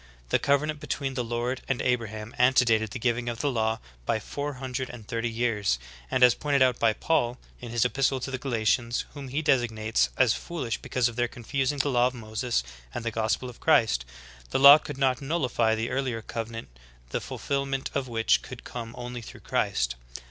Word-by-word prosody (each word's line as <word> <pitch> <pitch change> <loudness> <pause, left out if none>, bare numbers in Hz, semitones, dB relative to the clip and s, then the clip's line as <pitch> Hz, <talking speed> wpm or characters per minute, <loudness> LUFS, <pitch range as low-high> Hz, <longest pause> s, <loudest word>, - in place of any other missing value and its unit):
The - - +3
cove 140 +1 +3
nant 155 -1 -3
between 135 -2 -3
the 125 -1 -1
Lord 120 +2 -2
and 135 - 0
Abraham 115 -3 -2
antedated 120 -3 +4
the 105 - -5
giv 120 0 +1
ing 120 0 -3
of 120 0 -4
the 145 - +1
law 110 -2 0 0.3
by 110 - 0
four 145 +6 -4
hundred 130 0 -4
and 115 -4 -10
thirty 115 -1 -1
years, 110 - 0 0.3
and 130 - +2
as 125 -2 +8
pointed 140 -1 +2
out 125 -2 +2
by 115 - +4
Paul'' 125 -3 0 0.2
in 120 - -8
his 120 +1 +1
epistle 135 +1 +1
to 135 - -4
the 130 - -3
Galatians, 120 -1 0
whom 140 -2 -7
he 140 +5 -2
designates 115 -5 +2
as 125 -4 +5
fooHsh 140 -10 -4
because 125 -2 +1
of 120 -1 -6
their 120 0 +2
confusing 135 +4 -2
the 140 +1 +1
law 125 -2 +4
of 130 - -5
Moses 110 - -2 0.3
and 115 - -4
the 115 - 0
gospel 110 +3 -1
of 125 - -10
Christ, 115 - +3 0.5
the - - 0
law 140 +2 +10
could 135 - -7
not 130 -2 +1
nullify 130 -7 +1
the 110 +1 -2
earlier 125 -4 -2
covenant 115 - -5 0.4
the - - -1
fulfilment 140 -1 -2
of 135 -2 -1
which 115 -2 +2
could 130 -2 -10
come 115 -1 -7
only 125 0 -6
through 110 - -11
Christ. - - 0
120 Hz, 200 wpm, -27 LUFS, 115-135 Hz, 0.5 s, law